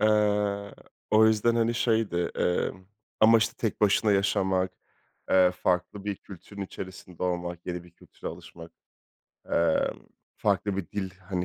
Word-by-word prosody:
Eee, 105 Hz, -1 st, +2 dB, 0.4 s
o 110 Hz, +1 st, +6 dB
yüzden, 110 Hz, +1 st, +3 dB
hani, 115 Hz, 0 st, +2 dB
şeydi, 110 Hz, -7 st, +1 dB
emm, 95 Hz, +1 st, -1 dB, 0.4 s
ama, 115 Hz, +1 st, +7 dB
işte, 110 Hz, 0 st, 0 dB
tek 110 Hz, -, -2 dB
başına 105 Hz, +1 st, +4 dB
yaşamak, 95 Hz, -2 st, +1 dB, 0.6 s
eee, 90 Hz, -1 st, +6 dB
farklı 90 Hz, +2 st, -1 dB
bir 100 Hz, -1 st, -2 dB
kültürün 100 Hz, +2 st, -10 dB
içerisinde 95 Hz, -2 st, -8 dB
olmak, 85 Hz, -1 st, -3 dB
yeni 90 Hz, -1 st, -4 dB
bir 85 Hz, -, -16 dB
kültüre 85 Hz, -, -9 dB
alışmak, 85 Hz, 0 st, -11 dB, 0.8 s
emm, 85 Hz, -1 st, +2 dB, 0.4 s
farklı 100 Hz, -1 st, 0 dB
bir 95 Hz, -5 st, -4 dB
dil, 95 Hz, -2 st, -3 dB, 0.2 s
hani, 90 Hz, -2 st, -1 dB
100 Hz, 135 wpm, -27 LUFS, 90-105 Hz, 0.8 s, ama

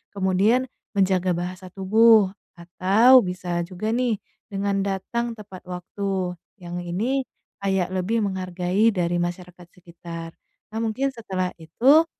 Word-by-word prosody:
Kemudian 200 Hz, +6 st, +3 dB, 0.3 s
menjaga 190 Hz, -2 st, +2 dB
bahasa 180 Hz, +2 st, -5 dB
tubuh 210 Hz, +1 st, +5 dB, 0.2 s
atau 195 Hz, +9 st, +5 dB
bisa 180 Hz, -1 st, -3 dB
juga 190 Hz, +4 st, -3 dB
nih 240 Hz, -1 st, +1 dB, 0.3 s
dengan 200 Hz, -1 st, -1 dB
datang 230 Hz, +5 st, -2 dB
tepat 200 Hz, -4 st, -11 dB
waktu, 185 Hz, 0 st, -3 dB, 0.3 s
yang 175 Hz, 0 st, -5 dB
ini 225 Hz, +10 st, -1 dB, 0.3 s
kayak 190 Hz, -2 st, 0 dB
lebih 195 Hz, +5 st, 0 dB
menghargai 185 Hz, +2 st, +1 dB
dari 175 Hz, -1 st, 0 dB
masyarakat 175 Hz, 0 st, -5 dB
sekitar. 170 Hz, -1 st, -9 dB, 0.4 s
Nah 220 Hz, -, -3 dB
mungkin 230 Hz, +5 st, 0 dB
setelah 190 Hz, -7 st, -3 dB
itu 260 Hz, -, +4 dB
190 Hz, 120 wpm, -24 LUFS, 180-220 Hz, 0.4 s, tubuh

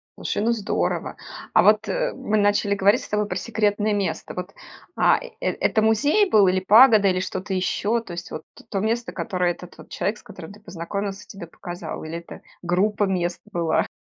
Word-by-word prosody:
Слушай, -, -, -2 dB
ну 230 Hz, -, +2 dB
здорово! 220 Hz, -4 st, -2 dB, 0.4 s
А -, -, +6 dB
вот, -, -, +4 dB
э, -, -, -1 dB
мы 215 Hz, -, -1 dB
начали 205 Hz, 0 st, +2 dB
говорить 200 Hz, +4 st, +3 dB
с -, -, -11 dB
тобой 210 Hz, 0 st, 0 dB
про -, -, -4 dB
секретное 210 Hz, -2 st, 0 dB
место. 200 Hz, -2 st, -3 dB
Вот, 180 Hz, +1 st, -5 dB, 0.4 s
а, -, -, +4 dB
э -, -, -10 dB
это 220 Hz, -, 0 dB
музей 285 Hz, -, +3 dB
был 205 Hz, -, +5 dB
или 185 Hz, +1 st, +2 dB
пагода, 215 Hz, +2 st, +6 dB
или 185 Hz, -1 st, +2 dB
что-то 190 Hz, +1 st, -4 dB
еще? 205 Hz, +4 st, 0 dB
То 185 Hz, -, -10 dB
есть 170 Hz, -, -7 dB
вот -, -, -7 dB, 0.3 s
то 195 Hz, -, -1 dB
место, 230 Hz, +3 st, -1 dB
которое 180 Hz, -5 st, -1 dB
этот 180 Hz, +1 st, -10 dB
вот -, -, -13 dB
человек, 200 Hz, +4 st, -2 dB
с -, -, -20 dB
которым 175 Hz, +1 st, -11 dB
ты 210 Hz, -, -15 dB
познакомился, 195 Hz, +1 st, -5 dB
тебе 195 Hz, -4 st, -10 dB
показал, 175 Hz, 0 st, -7 dB
или 160 Hz, +2 st, -5 dB
это 170 Hz, -, -12 dB, 0.2 s
группа 200 Hz, +4 st, +1 dB
мест 175 Hz, -2 st, -2 dB
была? 170 Hz, -4 st, 0 dB
200 Hz, 195 wpm, -23 LUFS, 180-215 Hz, 0.4 s, А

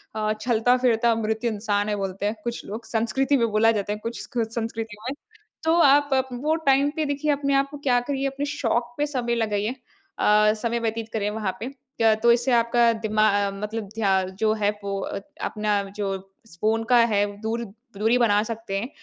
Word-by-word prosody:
अ, 215 Hz, -1 st, 0 dB
चलता 245 Hz, +1 st, +3 dB
फिरता 235 Hz, -2 st, +3 dB
मृत्य 220 Hz, +1 st, -1 dB
इंसान 205 Hz, -1 st, -1 dB
है, 210 Hz, -, 0 dB
बोलते 195 Hz, 0 st, -3 dB
हैं 210 Hz, +2 st, 0 dB
कुछ 235 Hz, 0 st, -4 dB
लोग 220 Hz, +3 st, -7 dB
संस्कृति 265 Hz, +5 st, +1 dB
में 235 Hz, -2 st, +2 dB
बोला 220 Hz, +2 st, +4 dB
जाता 205 Hz, -2 st, -1 dB
है 210 Hz, -, -6 dB
कुछ 230 Hz, +1 st, -5 dB
संस्कृति 225 Hz, -1 st, -3 dB
में। -, -, -2 dB, 0.5 s
तो 320 Hz, +1 st, +3 dB
आप 285 Hz, 0 st, +5 dB, 0.2 s
वो 290 Hz, +6 st, 0 dB
टाइम 275 Hz, +1 st, +4 dB
पे 315 Hz, -2 st, 0 dB
देखिए 285 Hz, +1 st, 0 dB
अपने 280 Hz, -1 st, 0 dB
आप 275 Hz, 0 st, +2 dB
क्या 245 Hz, -3 st, +3 dB
करिए 275 Hz, -1 st, 0 dB
अपने 275 Hz, +1 st, -3 dB
शौक 240 Hz, -2 st, -1 dB
पे 295 Hz, -, +1 dB
समय 250 Hz, -5 st, -1 dB
लगाइए। 215 Hz, +1 st, -1 dB, 0.4 s
अ, 210 Hz, 0 st, +4 dB
समय 235 Hz, +2 st, -2 dB
व्यतीत 225 Hz, 0 st, -3 dB
करें 210 Hz, -2 st, 0 dB
वहाँ 210 Hz, -3 st, -2 dB
पे। 230 Hz, -, -4 dB, 0.3 s
क्या 225 Hz, -1 st, +5 dB
तो 235 Hz, +2 st, +4 dB
इससे 240 Hz, +2 st, +2 dB
आपका 235 Hz, 0 st, +4 dB
दिमा 215 Hz, -1 st, 0 dB, 0.2 s
अ, -, -, -3 dB
मतलब 210 Hz, +2 st, -5 dB
ध्या 195 Hz, -4 st, +2 dB, 0.2 s
जो 215 Hz, -1 st, +3 dB
है 210 Hz, -2 st, +1 dB
वो 200 Hz, 0 st, -2 dB
अ, 200 Hz, -, -4 dB, 0.2 s
अपना 210 Hz, -1 st, 0 dB
जो 195 Hz, -2 st, -1 dB, 0.3 s
स 170 Hz, -, -15 dB
फ़ोन 225 Hz, +1 st, +1 dB
का 245 Hz, -, +6 dB, 0.2 s
है 205 Hz, 0 st, +3 dB, 0.2 s
दूर 230 Hz, +1 st, -2 dB, 0.3 s
दूरी 220 Hz, +4 st, +3 dB
बना 210 Hz, -4 st, +3 dB
सकते 225 Hz, -3 st, -4 dB
हैं। 235 Hz, +5 st, -5 dB
225 Hz, 195 wpm, -24 LUFS, 210-245 Hz, 0.5 s, का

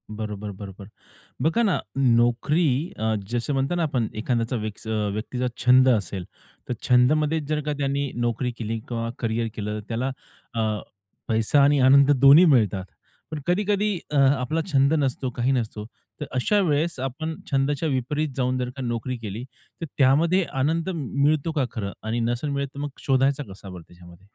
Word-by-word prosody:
बरोबर, 105 Hz, -1 st, -5 dB
बरोबर. 100 Hz, 0 st, -9 dB, 0.5 s
बघा 165 Hz, -, +2 dB
ना, 200 Hz, -5 st, +2 dB, 0.2 s
नोकरी 130 Hz, +5 st, +2 dB
अ, 110 Hz, 0 st, 0 dB
जसं 120 Hz, +5 st, -2 dB
म्हणतो 135 Hz, +5 st, 0 dB
ना 175 Hz, -, 0 dB
आपण 130 Hz, -8 st, 0 dB
एखाद्या 120 Hz, +1 st, -1 dB
विक्स 110 Hz, 0 st, -6 dB
अ, -, -, -2 dB, 0.2 s
व्यक्तीचा 125 Hz, +4 st, -3 dB, 0.2 s
छंद 130 Hz, +1 st, +6 dB
असेल, 100 Hz, -5 st, 0 dB, 0.4 s
तर 125 Hz, -, 0 dB
छंदमध्ये 150 Hz, +6 st, +3 dB
जर 150 Hz, 0 st, 0 dB
का 150 Hz, -, -1 dB
त्यांनी 140 Hz, 0 st, -1 dB
नोकरी 120 Hz, +1 st, -1 dB
केली 115 Hz, 0 st, -3 dB
किंवा 115 Hz, -1 st, -3 dB
करिअर 115 Hz, 0 st, -1 dB
केलं 105 Hz, 0 st, -3 dB
तर -, -, -10 dB
त्याला 120 Hz, +4 st, -2 dB, 0.4 s
अ, 115 Hz, -, -1 dB, 0.7 s
पैसा 115 Hz, +6 st, +3 dB
आणि 145 Hz, 0 st, +4 dB
आनंद 140 Hz, +2 st, +6 dB
दोन्ही 145 Hz, +6 st, +8 dB
मिळतात. 110 Hz, -, +3 dB, 0.5 s
पण 155 Hz, -, -4 dB
कधी-कधी 205 Hz, +2 st, +1 dB
अ, 150 Hz, -, +1 dB
आपला 135 Hz, +3 st, +2 dB
छंद 140 Hz, +2 st, +4 dB
नसतो 130 Hz, -1 st, -1 dB
काही 125 Hz, +2 st, +1 dB
नसतो. 110 Hz, -4 st, -2 dB, 0.3 s
तर 150 Hz, -, -3 dB
अशा 205 Hz, +11 st, +2 dB
वेळेस 150 Hz, 0 st, 0 dB
आपण 150 Hz, +5 st, -4 dB, 0.2 s
छंदाच्या 140 Hz, +3 st, +1 dB
विपरीत 145 Hz, +3 st, -1 dB
जाऊन 130 Hz, 0 st, 0 dB
जर 125 Hz, -1 st, -2 dB
का 135 Hz, -, -6 dB
नोकरी 120 Hz, +1 st, -3 dB
केली 110 Hz, 0 st, -6 dB, 0.4 s
तर -, -, -2 dB
त्यामध्ये 160 Hz, +8 st, +4 dB, 0.2 s
आनंद 160 Hz, +5 st, 0 dB
मि 165 Hz, -5 st, -3 dB, 0.2 s
मिळतो 155 Hz, +2 st, +2 dB
का 145 Hz, -5 st, 0 dB
खरं? 105 Hz, -5 st, -4 dB
आणि 110 Hz, +2 st, -2 dB
नसेल 120 Hz, +5 st, -1 dB
मिळेल 140 Hz, 0 st, -1 dB
तर 140 Hz, -, -8 dB
मग 145 Hz, -, -3 dB
शोधायचा 135 Hz, +1 st, +2 dB
कसा 95 Hz, 0 st, -11 dB
बरं 90 Hz, -2 st, -9 dB
त्याच्यामध्ये? 85 Hz, +1 st, -16 dB
130 Hz, 170 wpm, -24 LUFS, 115-145 Hz, 0.7 s, दोन्ही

